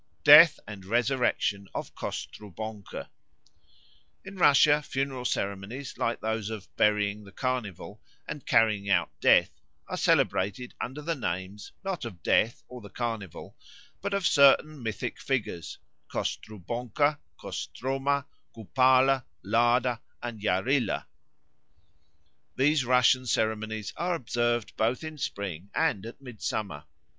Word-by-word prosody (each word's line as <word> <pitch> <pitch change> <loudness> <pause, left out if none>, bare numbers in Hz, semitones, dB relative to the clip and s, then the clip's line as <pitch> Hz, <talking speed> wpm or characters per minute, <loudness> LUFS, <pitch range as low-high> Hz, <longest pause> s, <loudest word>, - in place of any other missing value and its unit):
Death 150 +2 +9
and 100 -2 -8
Resurrection 115 -3 0
of - - -5
Kostrubonko 105 0 -7 1.2
I - - -7
RUSSIA 150 -5 +5
funeral 135 -2 -3
ceremonies 100 +5 -3
like 115 - -2
those 110 -1 -2
of 110 -3 -8
"Burying 105 0 +1
the 100 - -14
Carnival" 110 -5 -4 0.3
and 145 - -6
"Carrying 105 -3 +2
out 85 -3 +2
Death" - - +5 0.4
are - - -4
celebrated 105 +6 +1
under 145 +4 -5
the 165 +2 -1
names, 95 - -5
not 190 -6 -3
of 95 -8 -8
Death 115 +2 +2
or 125 -1 -10
the 105 - -11
Carnival, 110 -4 -5 0.5
but 200 - -2
of 200 -2 -1
certain 145 0 +5
mythic 110 -2 -4
figures, 110 -10 -3 0.3
Kostrubonko, 120 - -2 0.2
Kostroma, 135 +2 -2 0.3
Kupalo, 130 +3 +3 0.2
Lada, 120 +1 +2 0.2
and 120 -3 -6
Yarilo. 115 +7 +1 1.5
These 140 +1 +2
Russian 125 +1 +4
ceremonies 110 -2 -1
are 175 +1 0
observed 120 -4 -1
both 115 +6 0
in 155 -1 -7
spring 100 - -5
and 100 +2 0
at 115 - -10
midsummer. 105 - -5
120 Hz, 115 wpm, -28 LUFS, 105-135 Hz, 1.5 s, Death